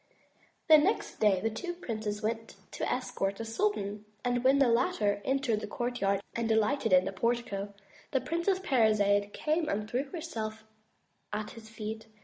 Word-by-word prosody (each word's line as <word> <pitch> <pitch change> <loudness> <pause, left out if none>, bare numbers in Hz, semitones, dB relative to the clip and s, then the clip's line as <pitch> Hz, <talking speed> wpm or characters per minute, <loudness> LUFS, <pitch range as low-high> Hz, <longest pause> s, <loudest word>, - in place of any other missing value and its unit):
Next 315 +6 +4
day 205 -3 +4
the 225 +3 -1
two 350 +11 -4
princes 215 -8 -4
went 225 +1 -3 0.2
to - - -2
escort 195 0 -1
the 225 - -5
sultan 220 - -1 0.2
and 245 0 +1
when 265 +2 +5
the 275 -2 +5
latter 215 -4 +2
entered 265 -5 +1
the - - -5
courtyard 220 -5 -1
and 230 -1 -1
alighted 225 +3 +2
at 185 0 +6
the 195 - -2
portico, 205 -1 -1 0.4
the 265 - +1
Princess 340 +7 0
Parizade 215 - +3
came 310 +5 0
and 210 +1 -1
threw 250 +5 -1
herself 225 -9 -5 0.7
at 210 +1 -3
his 220 -1 -12
feet. 220 0 -6
225 Hz, 155 wpm, -30 LUFS, 210-265 Hz, 0.7 s, at